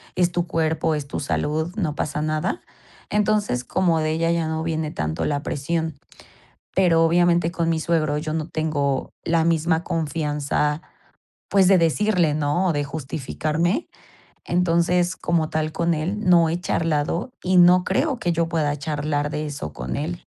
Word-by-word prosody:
es 180 Hz, -1 st, +2 dB
tu 175 Hz, 0 st, -1 dB
cuerpo, 160 Hz, 0 st, 0 dB
es 145 Hz, -2 st, -4 dB
tu -, -, -4 dB
salud, 155 Hz, +4 st, -1 dB
no 160 Hz, -8 st, -1 dB
pasa 150 Hz, -1 st, -2 dB
nada". 155 Hz, -, -1 dB, 0.5 s
Entonces, 210 Hz, -11 st, +1 dB
como 170 Hz, +3 st, +1 dB
de 155 Hz, 0 st, 0 dB
ella 165 Hz, +1 st, +1 dB
ya 170 Hz, -1 st, 0 dB
no 160 Hz, 0 st, -2 dB
viene 160 Hz, -1 st, -2 dB
tanto 80 Hz, -, -3 dB
la 145 Hz, -1 st, -1 dB
presión. 160 Hz, +1 st, -2 dB, 0.8 s
Pero, 170 Hz, -3 st, +4 dB
obviamente 170 Hz, 0 st, +3 dB
con 170 Hz, -2 st, -1 dB
mi 165 Hz, -1 st, +1 dB
suegro 155 Hz, -3 st, +1 dB
yo 155 Hz, 0 st, -3 dB
no 160 Hz, 0 st, -2 dB
tengo 145 Hz, -4 st, -1 dB
la 165 Hz, 0 st, +2 dB
misma 165 Hz, 0 st, +1 dB
confianza, 150 Hz, -1 st, -1 dB, 0.7 s
pues 195 Hz, -2 st, +4 dB
de 190 Hz, -1 st, +6 dB
decirle, 170 Hz, -1 st, +2 dB
¿no?, 150 Hz, +5 st, +1 dB
o -, -, +2 dB
de 145 Hz, -1 st, -1 dB
justificarme. 155 Hz, -, -2 dB, 0.6 s
Entonces, 175 Hz, +1 st, +2 dB
como 165 Hz, -2 st, 0 dB
tal 155 Hz, 0 st, -1 dB
con 170 Hz, 0 st, +1 dB
él 170 Hz, +7 st, -2 dB
no 170 Hz, -2 st, +6 dB
he 170 Hz, +2 st, -1 dB
charlado, 165 Hz, -, -1 dB
y 185 Hz, 0 st, +1 dB
no 180 Hz, +1 st, +7 dB
creo 265 Hz, +7 st, 0 dB
que 175 Hz, -, 0 dB
yo 165 Hz, 0 st, 0 dB
pueda 150 Hz, -3 st, 0 dB
charlar 145 Hz, 0 st, -2 dB
de 150 Hz, 0 st, -3 dB
eso 140 Hz, -, -5 dB
con 60 Hz, -1 st, -5 dB
él. 170 Hz, +5 st, -4 dB
160 Hz, 165 wpm, -23 LUFS, 150-175 Hz, 0.8 s, no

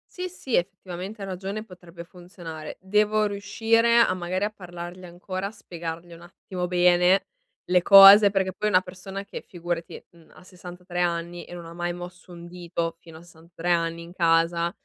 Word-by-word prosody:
Sì 365 Hz, 0 st, -4 dB
sì, 270 Hz, -9 st, -8 dB
effettivamente 185 Hz, +2 st, -4 dB
hai -, -, -6 dB
ragione, 195 Hz, +3 st, -5 dB
potrebbe 175 Hz, -3 st, -12 dB
funzionare. 170 Hz, -3 st, -10 dB
Devo 210 Hz, +2 st, +1 dB
riuscire 225 Hz, +3 st, +1 dB
a 230 Hz, -5 st, +5 dB
magari 185 Hz, +2 st, -3 dB
a 210 Hz, -, -1 dB
parlargli 175 Hz, -2 st, -9 dB
ancora, 185 Hz, +2 st, -5 dB
a 200 Hz, -, -8 dB
spiegargli 170 Hz, -4 st, -8 dB
un 170 Hz, -, -13 dB
attimo 180 Hz, 0 st, -6 dB
bene 180 Hz, +1 st, +3 dB, 0.4 s
le 180 Hz, 0 st, +2 dB
cose, 200 Hz, +2 st, +9 dB
perché 190 Hz, -2 st, -1 dB
poi 210 Hz, +3 st, -1 dB
una 185 Hz, -2 st, +4 dB
persona 190 Hz, +2 st, -8 dB
che -, -, -8 dB
figurati, 175 Hz, -1 st, -6 dB
mhmm, 170 Hz, -2 st, -21 dB
ha -, -, -16 dB
63 180 Hz, -1 st, -9 dB
anni 170 Hz, 0 st, -2 dB
e 175 Hz, -, -10 dB
non 170 Hz, -1 st, -10 dB
mai 175 Hz, 0 st, -3 dB
mosso 180 Hz, +1 st, -10 dB
un 170 Hz, 0 st, -10 dB
dito 170 Hz, -1 st, -4 dB
fino 165 Hz, -1 st, -14 dB
a -, -, -14 dB
63 170 Hz, +1 st, -6 dB
anni 165 Hz, 0 st, 0 dB
in 170 Hz, +1 st, -13 dB
casa, 170 Hz, 0 st, +2 dB
180 Hz, 175 wpm, -25 LUFS, 170-195 Hz, 0.4 s, cose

